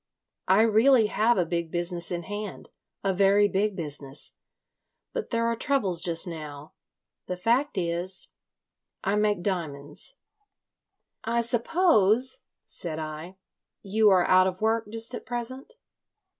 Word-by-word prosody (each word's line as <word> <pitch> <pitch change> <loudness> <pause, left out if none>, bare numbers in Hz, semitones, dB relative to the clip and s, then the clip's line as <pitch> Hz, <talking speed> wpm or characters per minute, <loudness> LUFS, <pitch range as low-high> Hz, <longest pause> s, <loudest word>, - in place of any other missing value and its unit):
I 195 +4 +5
really 230 +2 +4
have 230 +2 +3
a 180 - +2
big 170 0 -3
business 175 0 -2
in 175 -1 -3
hand, 205 +2 -7 0.3
a 195 -1 +1
very 200 +2 +4
big 205 +1 -1
business. 145 -5 -4 0.8
But 485 -2 -4
there 230 -1 0
are 230 0 0
troubles 215 -9 +1
just 170 -1 +1
now. 150 -3 -8 0.5
The 180 - -4
fact 235 +7 0
is.... 175 +1 -1 0.7
I 195 - 0
make 210 -3 +1
diamonds." 165 - -4 1.1
"I 235 +1 0
suppose," 245 - +4 0.2
said 160 -3 -6
I, 155 +3 -7 0.5
"you 210 +2 +3
are 185 -2 +4
out 185 0 +5
of 185 0 -4
work 220 0 0
just 225 +3 -2
at - - -6
present?" 255 - -5
195 Hz, 130 wpm, -26 LUFS, 175-230 Hz, 1.1 s, I